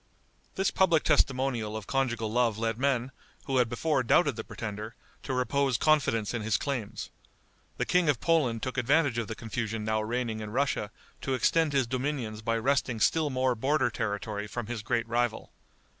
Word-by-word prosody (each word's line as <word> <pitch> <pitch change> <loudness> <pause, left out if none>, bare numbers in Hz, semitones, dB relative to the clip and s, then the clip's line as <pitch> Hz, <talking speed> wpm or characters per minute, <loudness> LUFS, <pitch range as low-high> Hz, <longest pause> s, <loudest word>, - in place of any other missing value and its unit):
This 190 +1 +1
public 170 -5 +3
testimonial 130 -7 +1
of 110 - -7
conjugal 120 -5 -1
love 115 -2 +2
led 115 0 -1
men, 135 -2 +1 0.3
who 135 -1 0
had 125 -2 +3
before 140 +4 +1
doubted 140 +2 +3
the 110 - -5
pretender, 110 +1 -6 0.3
to - - -5
repose 130 +1 +1
confidence 125 -8 +2
in 120 - -2
his 110 +2 +1
claims. 115 -7 -4 0.7
The - - 0
King 180 -3 +3
of 135 -6 +2
Poland 140 -9 +1
took 130 0 -2
advantage 140 0 +2
of 115 - -3
the 115 - -5
confusion 110 -1 -4
now 110 0 +1
reigning 115 0 -2
in 105 -1 -5
Russia 125 -3 0 0.3
to 135 - -1
extend 160 +5 +2
his 135 -2 +3
dominions 125 -3 -3
by 115 +1 0
wresting 125 -1 0
still 155 +5 +2
more 130 -1 +1
border 130 +1 +1
territory 105 0 -3
from 120 +2 -4
his 115 0 -4
great 115 +1 -1
rival. 120 -1 -1
120 Hz, 175 wpm, -29 LUFS, 110-135 Hz, 0.7 s, public